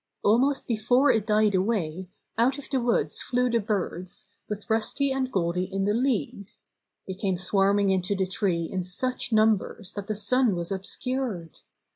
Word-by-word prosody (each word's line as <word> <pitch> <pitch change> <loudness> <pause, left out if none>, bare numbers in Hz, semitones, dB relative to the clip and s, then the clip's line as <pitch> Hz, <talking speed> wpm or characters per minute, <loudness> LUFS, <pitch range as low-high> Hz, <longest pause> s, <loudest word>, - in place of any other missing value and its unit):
Almost 260 +7 +2
before 245 +5 +3
it 220 -1 0
died 215 -1 +3
away, 185 -3 -1 0.3
out 250 +4 +2
of 285 - -8
the 265 - +2
woods 235 0 0
flew 250 0 0
the 235 - +2
birds, 190 -3 -4 0.2
with 210 -1 -5
Rusty 230 +5 +1
and 265 -1 -1
Goldy 180 0 -1
in 195 0 -1
the 205 - +2
lead. 230 -5 -1 0.6
They 190 - -5
came 190 -1 -1
swarming 195 +2 +2
into 190 +1 0
the 190 -1 0
tree 185 -3 -1
in 185 +3 -3
such 245 +8 -3
numbers 215 -2 +1
that 200 -1 -6
the 215 - -2
sun 220 +1 +2
was 170 +1 -4
obscured. 195 - -3
205 Hz, 165 wpm, -26 LUFS, 190-240 Hz, 0.6 s, before